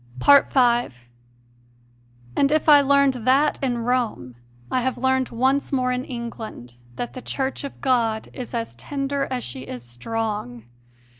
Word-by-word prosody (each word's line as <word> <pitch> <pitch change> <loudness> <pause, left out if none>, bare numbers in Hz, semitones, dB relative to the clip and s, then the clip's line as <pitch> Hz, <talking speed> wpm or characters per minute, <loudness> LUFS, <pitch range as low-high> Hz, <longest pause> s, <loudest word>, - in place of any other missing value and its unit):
5. 240 - +4 1.3
And 280 0 +3
if 310 +1 +1
I 295 -2 +8
learned 280 -1 +4
that 275 +5 +3
in 250 -3 0
Rome, 235 - -1 0.4
I 255 - +1
have 260 +1 -1
learned 260 0 +1
once 265 +4 0
more 255 -2 +1
in 250 +1 -2
England 230 - -7 0.2
that 240 - -5
the 255 - -7
Church 270 +2 -3
of 280 - -7
God 230 -4 +1
is 250 -1 -7
as 230 -1 -3
tender 280 0 -2
as 255 -2 -3
she 125 +2 -6
is 125 -2 -8
strong. 125 - -4
250 Hz, 145 wpm, -23 LUFS, 225-270 Hz, 1.3 s, I